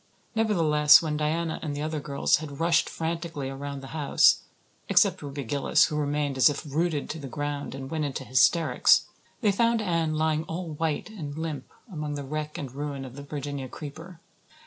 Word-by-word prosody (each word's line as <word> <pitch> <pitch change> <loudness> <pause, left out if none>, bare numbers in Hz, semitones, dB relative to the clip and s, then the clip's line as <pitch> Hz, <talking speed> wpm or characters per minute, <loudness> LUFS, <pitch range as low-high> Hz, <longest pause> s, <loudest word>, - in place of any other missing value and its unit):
Nevertheless, 165 -10 +5
when 155 -2 -1
Diana 160 +2 -1
and 145 -3 -4
the 145 - -3
other 155 0 -2
girls 140 -1 +1
had 145 -3 -8
rushed 170 0 +3
frantically 165 -4 -4
around 140 0 -6
the 135 - -9
house 150 -3 +4 0.5
except - - +4
Ruby 140 -1 -5
Gillis, 135 +4 +2
who 150 - -4
remained 145 -2 -1
as 130 - +6
if 145 - -4
rooted 155 +1 -1
to 160 - -6
the 140 - -7
ground 145 0 -4
and 135 0 -7
went 155 -2 -1
into 140 -1 -4
hysterics 155 +6 +4 0.4
they 210 -4 +4
found 230 +3 +2
Anne 165 -6 0
lying 155 0 +1
all 170 +1 -5
white 155 +6 -2
and 150 -8 -7
limp 155 -4 -4 0.2
among 150 -2 -3
the 145 - -4
wreck 150 +2 -4
and 135 -4 -5
ruin 140 -1 -4
of 130 -1 -10
the 140 - -8
Virginia 140 -2 -5
creeper. 160 +5 -9
150 Hz, 185 wpm, -27 LUFS, 140-165 Hz, 0.5 s, as